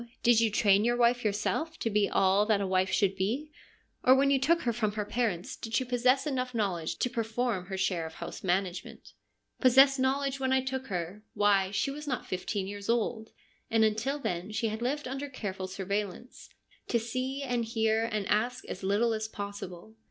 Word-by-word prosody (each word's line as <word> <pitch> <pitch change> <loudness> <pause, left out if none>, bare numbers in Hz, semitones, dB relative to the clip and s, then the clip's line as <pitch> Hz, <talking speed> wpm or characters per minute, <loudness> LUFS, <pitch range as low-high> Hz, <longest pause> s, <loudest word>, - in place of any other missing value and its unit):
Did 235 -1 +5
you 225 - +3
train 205 -1 +4
your 240 +1 +2
wife 245 +1 +3
yourself 220 +10 -1
to 225 - -2
be 205 -1 +2
all 195 +2 +3
that 215 -2 +3
a 200 - -1
wife 185 0 +1
should 195 0 +2
be? 240 +11 -2 0.5
Or, 255 - +7
when 275 +1 +3
you 275 - +4
took 335 +5 +2
her 235 - +1
from 215 -2 -1
her 210 -1 -2
parents, 210 -6 -2
did 225 0 -5
she 260 - +1
possess 250 +3 +2
enough 255 -4 -2
knowledge 185 -7 -1
to - - +1
perform 225 -4 -1
her 190 -1 -4
share 180 -3 0
of 160 - -12
house - - -7
management? 185 0 -2
' - - -49
' - - -37
Possess 270 +1 +6
knowledge 270 +1 0
when 265 -1 0
I 265 0 +3
took 265 0 -4
her? 180 +2 -4
Why, 200 -2 +3
she 210 +7 -1
was 300 +2 -8
not 260 -3 -2
fifteen 190 +2 -3
years 200 +1 -7
old, 225 -1 0 0.4
and 225 0 +3
until 220 +7 0
then 185 -7 -3
she 220 +1 -1
had 220 +2 -5
lived 280 +4 -1
under 270 +2 -4
careful 190 -7 -5
surveillance 200 +4 -4 0.2
— - - -32
to 235 - +2
see 255 +4 -3
and 245 -3 -1
hear, 225 0 +1
and 215 -3 -2
ask 245 +5 0
as 185 - -6
little 205 +4 +2
as 220 0 -2
possible. 200 -2 -7
220 Hz, 205 wpm, -29 LUFS, 200-255 Hz, 0.5 s, Or